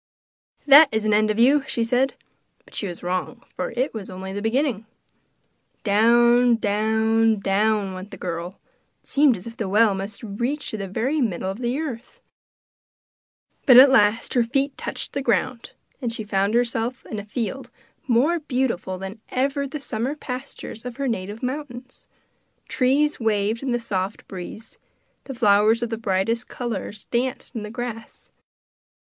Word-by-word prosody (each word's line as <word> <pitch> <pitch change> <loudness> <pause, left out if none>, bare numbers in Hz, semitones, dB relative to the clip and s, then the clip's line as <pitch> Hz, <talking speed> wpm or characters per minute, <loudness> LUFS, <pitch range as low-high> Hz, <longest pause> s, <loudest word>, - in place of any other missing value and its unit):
'That 290 +1 +9
is 220 0 -1
an 215 - +2
end 215 +1 +3
of 215 - 0
you!' 270 +5 +5
she 235 - -1
said. 250 +4 +1 0.5
But - - -20
she 205 - -3
was 175 -1 -7
wrong, 185 +7 -3
for - - -2
it 250 +4 -2
was 215 -4 -6
only 190 +1 -7
the 205 - -4
beginning. 225 -1 0 1.0
Down, 235 +3 +5
down, 220 +1 +2
down 200 0 +1
went 185 +2 -8
the - - -10
girl 175 +1 -5 0.4
it - - -25
seemed 280 -5 +4
as 180 - -11
if 230 0 -9
the 210 -4 -3
well 210 +1 +4
must 195 +3 -6
reach 240 +8 -3
to 220 - -4
the 195 -1 -4
very 260 +10 -1
middle 190 -5 -1
of 195 - -8
the 245 +2 -1
earth; 260 -6 -6 1.5
but 255 -3 +9
at 265 +1 +10
last 210 -2 +3
her 245 - +4
feet 275 +4 0
touched - - -6
the 280 - -1
ground, 235 0 -1 0.3
and 240 -3 -2
she 225 -1 -5
found 200 +1 0
herself 240 0 -1
in 215 - -5
a - - -6
field 230 +4 -4 0.4
more 275 +8 +3
beautiful 250 - -2
than 195 +3 -8
even 275 +2 0
the 300 - -5
summer 260 +1 -3
pastures 250 -5 -7
of 250 0 -7
her 280 -1 -1
native 210 0 -4
mountains. 255 -1 -6 0.6
Trees 280 +4 +2
waved 220 0 0
in 270 - -3
the 240 - +1
soft 195 -3 -3
breeze, 190 +4 -8 0.5
and 270 -3 -6
flowers 215 +2 +4
of 235 - -3
the - - 0
brightest 225 +3 0
colours 215 -3 -5
danced 250 +1 -2
in 225 - -3
the 210 - -6
grass. 235 -1 -7
230 Hz, 165 wpm, -23 LUFS, 205-255 Hz, 1.5 s, at